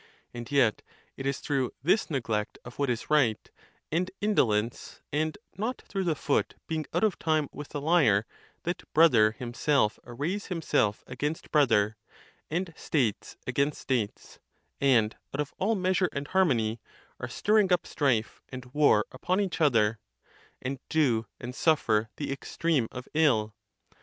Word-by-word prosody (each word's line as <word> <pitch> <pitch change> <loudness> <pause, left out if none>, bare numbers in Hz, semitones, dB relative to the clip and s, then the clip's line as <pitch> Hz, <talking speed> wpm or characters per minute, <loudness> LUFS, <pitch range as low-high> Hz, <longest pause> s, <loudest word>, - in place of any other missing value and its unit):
And 120 +1 -7
yet 130 -6 +3 0.3
it 135 - -4
is 140 -1 -2
through 135 -4 -1
this 185 +7 +2
neglect 110 -7 -2
of 120 +2 -11
what 140 -2 +1
is 120 +4 -3
right, 130 -8 +2 0.4
and 175 +4 0
indolence, 115 - 0
and 155 +3 0 0.2
not 230 +5 -3
through 195 -2 -3
the 165 -3 +1
foot 140 0 0
being 160 -1 -3
out - - 0
of 215 -4 +1
time 155 -2 +1
with 145 0 -8
thelyre, 145 - +3 0.4
that 175 +2 -2
brother 125 -10 +6
himself 120 -1 0
arrays 150 +12 -3
himself 160 - 0
against 145 +5 -4
brother, 110 -8 +3 0.5
and 170 +1 -2
states 120 -9 -1
against 140 +3 0
states, 120 -6 -3 0.4
and, 120 -6 +3 0.2
out - - -4
of 145 -1 -2
all 220 +4 +2
measure 185 -1 +1
and 140 +1 -4
harmony, 120 - +2 0.4
are - - -5
stirring 210 -2 +2
up 180 - +3
strife 120 -7 0
and 130 -1 -9
war 145 -8 +4
upon 180 +9 -1
each 195 -4 -2
other, 115 -7 +3 0.6
and 135 +1 -3
do 125 -9 +2
and 120 +1 -6
suffer 115 -8 +2
the 145 - -4
extreme 140 -2 0
of 125 0 -8
ill. 120 -9 +3
140 Hz, 145 wpm, -28 LUFS, 115-160 Hz, 0.6 s, brother